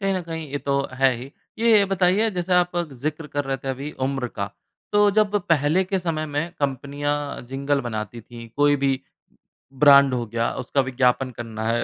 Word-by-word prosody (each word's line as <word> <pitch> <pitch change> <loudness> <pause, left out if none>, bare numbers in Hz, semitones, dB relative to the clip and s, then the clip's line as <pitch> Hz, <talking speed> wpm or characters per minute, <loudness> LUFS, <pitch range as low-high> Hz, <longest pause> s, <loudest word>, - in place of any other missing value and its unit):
कहीं 195 -1 0
न 185 - -1
कहीं 165 -1 -6
ये 145 - -2
तो 140 -1 0 0.2
है 135 0 +3
ही। 125 +3 -9 0.3
ये 225 -3 +5
बताइए 190 +4 +3
जैसे 180 -1 -3
आप 180 0 +2 0.3
जिक्र 155 +1 -3
कर 145 - +1
रहे 135 0 -1
थे 135 - -8
अभी 135 +3 -4 0.2
उम्र 135 -2 -2
का 100 0 -2 0.4
तो 205 0 +5
जब 210 0 +2
पहले 155 +3 +3
के 190 +1 -1
समय 165 -3 -2
में 150 +3 -3
कंपनियाँ 145 +1 -2
जिंगल 140 +2 -1
बनाती 115 -1 -5
थी 115 +1 -11
कोई 145 0 +4
भी 135 -1 0 0.8
ब्रांड 140 -2 +7
हो 120 -2 -1
गया, 115 +1 -1
उसका 130 +2 0
विज्ञापन 130 0 +1
करना 115 -2 -6
है, 115 +1 +1
140 Hz, 190 wpm, -23 LUFS, 130-170 Hz, 0.8 s, ब्रांड